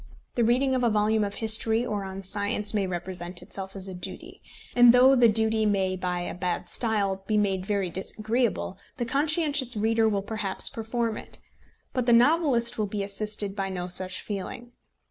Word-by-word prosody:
The 240 - +1
reading 255 +4 +2
of 255 -1 0
a 240 - +3
volume 215 0 +1
of 200 0 -4
history 225 +1 +4
or 210 -4 -3
on 190 0 -7
science 205 +2 +1
may 200 -3 0
represent 175 0 -5
itself 195 0 -5
as 195 0 -2
a 190 - -6
duty; 180 - -9 0.3
and 245 -1 +7
though 260 +2 +6
the 245 -2 +5
duty 220 0 +1
may 195 -3 +1
by 180 -1 -3
a 175 - -5
bad 180 0 -3
style 200 -4 0
be 215 - +1
made 195 -2 0
very 200 -4 -1
disagreeable, 215 +2 -1 0.2
the 240 - -2
conscientious 285 -2 +1
reader 225 +1 +2
will 200 -2 -1
perhaps 205 -2 -1
perform 230 -2 -3
it. - - -10 0.6
But 255 -1 -2
the 240 - +5
novelist 245 -3 +3
will 210 - 0
be 200 0 -3
assisted 205 0 -1
by 195 -1 -3
no 180 -1 -4
such 185 +1 -2
feeling. 210 +4 -6
210 Hz, 185 wpm, -26 LUFS, 195-235 Hz, 0.6 s, and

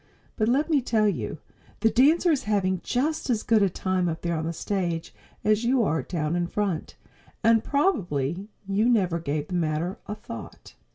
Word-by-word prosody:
But 215 0 +1
let 275 +5 +2
me 305 -4 +3
tell 220 -3 +2
you, 205 - -2 0.4
the 225 - +4
dancer 315 +7 +4
is 285 -8 0
having 190 -3 +1
just 290 +4 -1
as 225 -3 +1
good 225 -2 +3
a 200 - +4
time 185 0 -1
up 160 0 -5
there 170 -1 0
on 160 0 -2
the - - -1
stage 170 -1 -2 0.3
as 215 +1 +2
you 245 0 +3
are 160 -5 +1
down 160 -2 -2
in 175 0 0
front; 195 -4 -2 0.5
and 225 0 +4
probably 190 - 0 0.2
you 205 +4 +2
never 185 -8 +2
gave 150 -1 -3
the - - -5
matter 170 +2 -1
a 210 - -4
thought! 115 - -10
200 Hz, 185 wpm, -26 LUFS, 170-230 Hz, 0.5 s, the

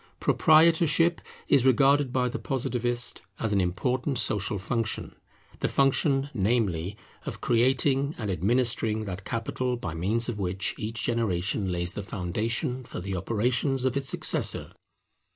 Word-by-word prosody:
Proprietorship 165 +1 +4 0.3
is 130 - +4
regarded 135 +1 +4
by 125 -1 +1
the 120 - -4
Positivist 120 -2 -2 0.2
as 110 -2 -1
an 100 - +3
important 125 +10 -1
social 105 -1 +2
function; 110 +2 -2 0.5
the - - 0
function, 135 0 +2
namely, 100 -4 0 0.3
of - - -5
creating 135 +4 +2
and 105 -4 -3
administering 110 +3 0
that 95 -1 -6
capital 125 +2 -2
by 85 -9 -5
means 105 +8 -1
of 115 -4 -4
which 95 0 -1
each 115 0 -4
generation 100 -4 0
lays 85 0 -1
the 105 - -4
foundation 110 +7 -2
for 115 - -7
the 95 +1 -4
operations 125 - 0
of 130 0 +1
its 135 -1 -1
successor. - - -2
115 Hz, 135 wpm, -27 LUFS, 100-130 Hz, 0.5 s, Proprietorship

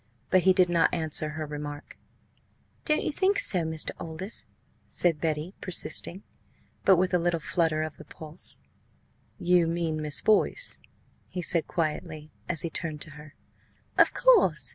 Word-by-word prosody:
But 185 - +5
he 185 +1 +4
did 185 -1 +3
not 170 -1 +2
answer 155 -2 0
her 155 0 -5
remark. 145 0 -8 0.9
"Don't 305 0 +1
you - - -1
think 385 +6 +1
so, 210 - +3
Mr. 160 -1 -2
Aldous?" 165 +6 -5 0.4
said 170 -4 +2
Betty, 160 +2 -2
persisting, 180 +1 +2 0.6
but 190 - +6
with 185 +1 0
a 180 - +3
little 170 0 0
flutter 160 -1 0
of 155 -1 -7
the - - -12
pulse. 160 +2 -6 0.8
"You 175 -1 +2
mean 165 -2 -2
Miss 150 -1 +4
Boyce?" 220 - +1 0.5
he 180 - -5
said 170 0 +3
quietly, 155 -1 -4 0.2
as 165 -5 +2
he 170 - -3
turned 155 -4 -4
to 155 - -8
her. 150 +1 -14 0.6
"Of - - +5
course!" 180 - +3
165 Hz, 155 wpm, -27 LUFS, 155-180 Hz, 0.9 s, but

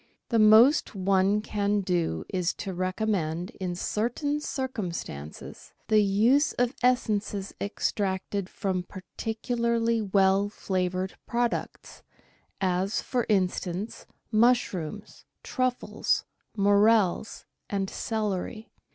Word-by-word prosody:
The 230 - +2
most 220 +6 +6
one 195 +2 +2
can 205 -1 0
do 170 - -1
is 180 -2 -1
to 195 - -5
recommend, 185 -2 -1
in 180 -1 -2
certain 245 - -1
circum 260 - -3
stances, 75 - -8 0.2
the 215 -1 +5
use 225 +9 +3
of 245 +1 0
essences 210 -5 0
extracted 200 -1 -2
from 190 -2 -2
particularly 230 +4 -2
well 195 0 +3
flavoured 185 -2 -2
products, 240 0 -2 0.6
as, 190 +2 0
for 245 -3 -1
instance, 185 0 -1 0.2
mushrooms, 215 -5 0 0.2
truffles, 255 -1 -1 0.3
morels, 205 0 +3 0.2
and 195 -1 -1
celery. 215 +1 -3
205 Hz, 95 wpm, -27 LUFS, 185-225 Hz, 0.6 s, most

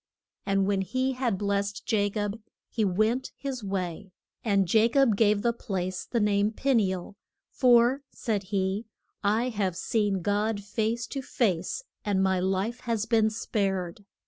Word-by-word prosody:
And 195 -1 +2
when 195 -1 +1
he 255 +8 0
had 250 -6 -1
blest 200 0 -1
Ja 205 -2 +2
cob 205 +1 -3 0.3
he 225 - 0
went 215 +6 +1
his 265 -4 -5
way. 190 -1 -4 0.3
And 200 -3 +2
Ja 220 0 +6
cob 270 -5 +4
gave 210 0 +3
the 235 -1 +2
place 185 -5 -3
the 235 - 0
name 205 -1 +3
of 220 - -5
Pe 275 0 +1
ni 210 -6 +3
el, 185 +1 -6 0.4
for, 245 +1 +4
said 215 -5 -2
he, 195 +2 -1 0.4
I 220 +5 +2
have 195 -6 -1
seen 205 -2 0
God 205 +1 0
face 225 +3 -1
to 275 - -5
face 205 - -1 0.2
and 195 -2 +1
my 190 -1 +2
life 195 +6 -1
has 230 -3 -1
been 225 -1 +3
spared. 195 -4 -2
205 Hz, 165 wpm, -27 LUFS, 195-230 Hz, 0.4 s, Ja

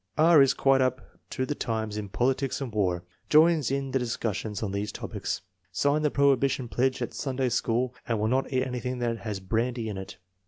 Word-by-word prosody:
B. 155 - +4
is 155 -5 +6
quite 135 -1 +3
up 130 0 -2
to 130 - -2
the 145 - -2
times 110 -6 -3
in 105 -2 -4
politics 130 +5 0
and 130 -5 -5
war. 90 -4 0 0.3
Joins 155 -3 +5
in 135 0 -2
the 135 - +1
discussions 115 -3 -3
on 100 - -2
these 100 +1 -2
topics. - - -4 0.3
Signed 145 +10 +1
the - - +4
prohibition 140 -2 +2
pledge 130 +1 0
at - - -5
Sunday 130 -2 -1
School 120 +1 0
and 115 -3 0
will 105 - +1
not 130 +4 0
eat 130 -1 +1
anything 125 -1 -3
that 120 -2 -1
has 105 -4 -4
brandy 115 +4 -1
in 100 -2 -4
it. 95 - -9
125 Hz, 200 wpm, -27 LUFS, 110-135 Hz, 0.3 s, is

